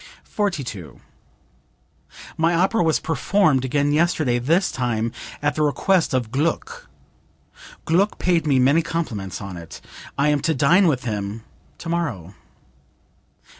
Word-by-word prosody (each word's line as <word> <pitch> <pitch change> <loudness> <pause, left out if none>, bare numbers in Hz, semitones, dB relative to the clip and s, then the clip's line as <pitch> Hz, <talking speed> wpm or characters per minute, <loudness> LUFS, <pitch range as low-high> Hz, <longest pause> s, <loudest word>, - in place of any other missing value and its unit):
42. 125 - -4 1.4
"My 165 +1 +2
opera 190 +6 +2
was 160 -2 +2
performed 160 -4 +1
again 145 +2 +1
yesterday, 155 -6 +1
this 165 +10 +1
time 120 -3 -1 0.3
at 145 - +2
the 155 - -2
request 160 +1 +2
of 120 -4 -1
Gluck. 305 - -2 1.0
Gluck 190 +6 +2
paid 170 -3 +1
me 140 -3 +3
many 140 +6 +4
compliments 130 - -4
on 100 -3 -7
it. 85 -3 -10 0.4
I 140 +2 +2
am 150 -1 +2
to 160 +2 0
dine 175 +8 +4
with 135 -5 0
him 105 -1 -4 0.3
tomorrow." 150 - -3
145 Hz, 125 wpm, -22 LUFS, 120-170 Hz, 1.4 s, many